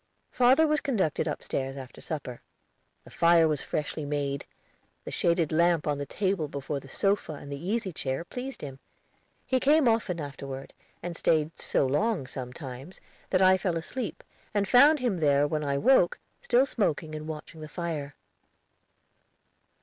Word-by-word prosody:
Father 260 +6 +5
was 305 -1 +1
conducted 195 - 0
upstairs, 135 0 -3
after 130 -2 -10
supper. 140 -6 -6 0.6
The - - -15
fire 170 -1 +5
was 150 -2 0
freshly 155 +1 -3
made; 145 -1 -2 0.6
the - - -6
shaded 170 -2 +1
lamp 170 0 +3
on 145 -1 0
the 140 - -4
table 190 -5 -1
before 140 0 -4
the 135 - -14
sofa 195 +3 0
and 145 -1 -9
the 140 +2 -6
easy 200 -1 -1
chair 135 +1 -2
pleased 255 +4 -6
him. 135 -2 -7 0.7
He 260 - +1
came 290 +1 +4
often 225 -7 +1
afterward, 140 -2 -7 0.3
and 175 0 -4
stayed 155 -1 +2
so - - +2
long, 175 - +1
sometimes, 130 +4 -8 0.3
that 185 0 +3
I 185 0 +6
fell 180 -3 0
asleep, 220 +8 -5 0.3
and 200 -1 +2
found 285 +7 +7
him 245 -8 0
there, 145 -3 +3
when 150 +1 -1
I 140 -1 0
woke, 230 - +4 0.2
still 250 +2 +4
smoking 160 - -1
and 155 0 -6
watching 155 +1 -8
the 155 - -6
fire. 150 -4 -4
160 Hz, 155 wpm, -28 LUFS, 140-200 Hz, 0.7 s, found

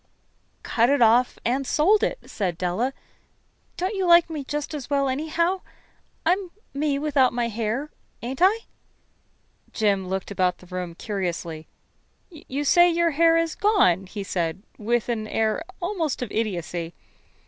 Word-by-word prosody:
"Cut 235 +1 +2
it 285 0 +3
off 240 +2 +4
and 260 +3 0
sold 395 +8 +4
it," - - 0
said 180 -5 -2
Della. 185 +9 0 0.9
"Don't 370 +4 -1
you 385 -3 -1
like 340 -1 +6
me 300 -3 -4
just 295 +3 -4
as 290 -4 -6
well, 280 -1 +2
anyhow? 320 +7 0 0.6
I'm 365 +2 +1 0.2
me 285 0 0
without 280 -3 +2
my 240 -1 0
hair, 230 +6 -2 0.3
ain't 260 +3 -4
I?" 410 +5 +5 1.1
Jim 200 -4 +1
looked 190 +1 -3
about 185 -2 +1
the - - -16
room 180 -2 -5
curiously. 175 -6 -4 0.6
"You 290 -3 -5
say 350 +4 +6
your 340 0 +2
hair 330 +2 +4
is 330 -1 0
gone?" 195 - +3
he 205 +1 -6
said, 175 -1 -2 0.2
with 235 +2 0
an 220 -3 -2
air 220 +6 0 0.2
almost 345 -8 -2
of 235 - -6
idiocy. 175 -6 -3
255 Hz, 150 wpm, -24 LUFS, 200-325 Hz, 1.1 s, like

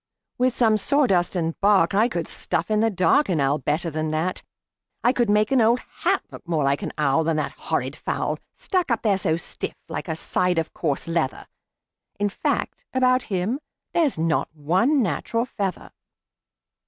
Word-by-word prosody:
"With 255 0 +2
some 220 -3 +4
sawdust 200 -8 +2
and 165 -2 0
bark 200 -4 +4
I 215 +4 +4
could 170 -9 -3
stuff - - -2
in 215 - +3
the 225 +1 +3
dark 185 - +3
An 170 -4 +1
owl 140 +2 +2
better 155 +4 -1
than 155 +1 -2
that. 160 +4 -1 0.6
I 245 - +4
could 240 -4 +1
make 210 +2 +3
an 265 -3 +4
old 230 +3 +4 0.2
hat - - +1
Look - - -12
more 160 -4 +1
like 140 +1 +1
an - - -4
owl 150 +1 +2
Than 165 0 0
that 155 - -1
horrid - - -3
fowl, - - -2 0.2
Stuck 365 -5 -1
up 235 -2 0
there 200 -4 +2
so 160 -3 +1
stiff - - -5
like - - -5
a 160 - -2
side 180 +2 0
of 160 -1 -1
coarse 150 -2 -2
leather. 165 -5 -1 0.7
In 205 0 +1
fact, - - -2
about 255 0 +4
him 195 +7 -1 0.3
there's 315 - +2
not 160 -1 0
one 190 - +2
natural 225 - -1
feather." 200 -7 -4
185 Hz, 180 wpm, -24 LUFS, 160-230 Hz, 0.7 s, some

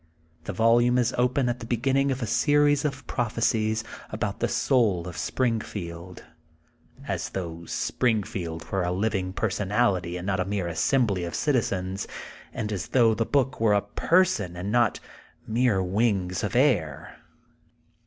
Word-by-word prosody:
The - - -3
volume 120 +4 +3
is 125 0 +1
open 125 +1 +1
at 120 0 -1
the 115 - -8
begin 120 +3 0
ning 135 +1 +3
of 130 -1 -2
a - - 0
series 145 +3 +3
of 140 -3 -3
prophecies 110 -2 0 0.3
about - - -3
the - - +1
soul 105 -10 +1
of 90 - -7
Springfield, 90 -8 -3 0.8
as - - -2
though 85 -3 -6
Springfield 95 -8 -1
were 95 - 0
a 90 0 -1
living 95 -1 -1
personality 95 -3 0
and 90 - -6
not 95 -1 0
a 90 - 0
mere 100 -2 -2
assembly 100 - +1
of 85 - -4
citizens, 100 -9 -1 0.4
and 110 -1 -4
as 100 -2 -3
though 115 -3 +4
the 115 +1 -1
book 135 -2 0
were 110 -2 +4
a 100 - +3
per 170 - +3
son, 105 - -3
and 95 +4 -4
not 120 -2 +2 0.5
mere 115 -4 +1
wings 95 -2 0
of 105 0 -2
air. 105 - +1
110 Hz, 155 wpm, -26 LUFS, 90-125 Hz, 0.8 s, though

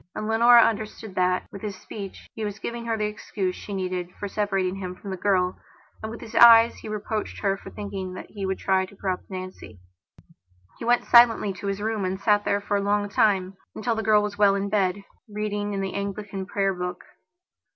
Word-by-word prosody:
And 215 - -3
Leonora 235 +1 +7
understood 220 -1 -2
that, 185 0 +1
with 200 - -9
his 210 -2 -4
speech, 195 0 -9
he 220 - -5
was 205 -1 -4
giving 235 +3 -5
her 225 -1 -1
the 210 - 0
excuse 205 -3 -3
that - - -11
she - - -9
needed 185 -2 -3
for 205 - -3
separating 195 -2 -1
him 185 -2 -5
from 195 +1 -8
the - - -2
girl, 185 -1 +1 0.4
and 220 - -5
with 230 - -8
his 220 - -10
eyes 230 0 +8
he - - -9
was 215 - -2
reproaching 210 +1 -4
her 195 -1 +2
for - - -11
thinking 195 -3 -6
that - - -9
he 205 -2 -6
would 190 0 -1
try 190 -1 +1
to 200 - -16
corrupt 190 -2 -4
Nancy. 185 - -8 1.0
He - - -5
went 240 +1 +3
silently 235 -4 +6
up 190 - -10
to 200 - -6
his 200 0 -2
room 220 -2 -1
and 185 +1 -2
sat 205 0 +2
there 200 - +1
for 205 0 0
a - - 0
long 205 0 0
timeuntil 200 +3 0
the 220 - -1
girl 210 -1 +4
was 205 0 -5
well 200 -1 +5
in 200 0 -2
bedreading 205 +1 -2
in 195 - -2
the 195 -1 -3
Anglican 200 -1 -4
prayer 195 -1 0
book. 180 0 -5
200 Hz, 215 wpm, -25 LUFS, 190-215 Hz, 1.0 s, eyes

